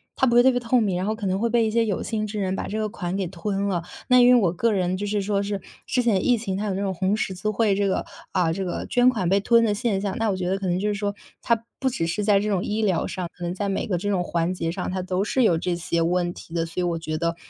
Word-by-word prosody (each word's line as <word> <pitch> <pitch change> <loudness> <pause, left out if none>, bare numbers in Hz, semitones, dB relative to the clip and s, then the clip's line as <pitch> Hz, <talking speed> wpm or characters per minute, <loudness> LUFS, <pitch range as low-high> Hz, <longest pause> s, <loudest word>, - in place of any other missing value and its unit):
它 260 - +2
不 235 - +2
会 240 - +7
特 260 - +6
别 245 - 0
透 245 +1 +2
明， 200 -5 +1
然 185 +2 -1
后 215 - 0
可 215 -2 -6
能 190 0 0
会 235 +2 +1
被 230 -1 +3
一 220 - 0
些 230 +1 +2
有 205 -3 -2
心 215 -1 -2
之 210 0 -4
人 190 -1 -1
把 - - -4
这 215 - -3
个 215 -1 0
款 180 -2 -4
给 195 -1 -1
吞 195 +3 -2
了。 180 -4 0 0.3
那 250 -1 +6
因 245 - +7
为 250 - +7
我 180 -6 +2
个 230 +6 +1
人 185 -1 0
就 205 +2 -3
是 205 -1 0
说 200 0 0
是， 200 0 -2 0.3
之 250 - +1
前 210 -6 +2
疫 245 -2 +3
情， 200 -4 -3
它 205 +2 -2
有 195 - -1
那 195 - -2
种 195 -1 -1
红 190 +3 0
十 195 - -2
字 200 +4 -3
会 215 -1 +2
这 200 0 +1
个 190 - -1 0.3
啊， 175 -4 +1
这 195 +3 -3
个 180 - -3
捐 245 0 +4
款 215 -8 -1
被 195 +3 +3
吞 230 +3 +4
的 210 - +1
现 210 -3 0
象， 195 -1 -2
那 225 -1 +1
我 190 - -1
觉 180 - -2
得 190 +2 0
可 195 - -3
能 180 0 +1
就 210 - -1
是 210 - +1
说， 205 0 -2 0.3
它 230 -1 0
不 265 - +1
只 235 -10 -2
是 185 +5 -2
在 205 -1 +4
这 210 - -2
种 195 -3 0
医 215 +1 -1
疗 185 -5 +1
上。 185 -3 -4
可 175 - -9
能 175 0 -2
在 200 +2 -3
每 195 - -1
个 185 - 0
这 205 +4 -2
种 185 -3 +1
环 170 +1 -1
节 165 -2 -2
上， 180 +1 -4
它 185 0 -2
都 185 +1 -1
是 260 +4 0
有 175 -7 +4
这 175 +1 -1
些 170 0 -2
问 175 +1 +1
题 165 - -12
的。 170 -1 0
所 165 +2 -6
以 - - +1
我 170 -1 0
觉 155 -1 -4
得， 170 +1 -1
195 Hz, 355 characters per minute, -24 LUFS, 180-215 Hz, 0.3 s, 会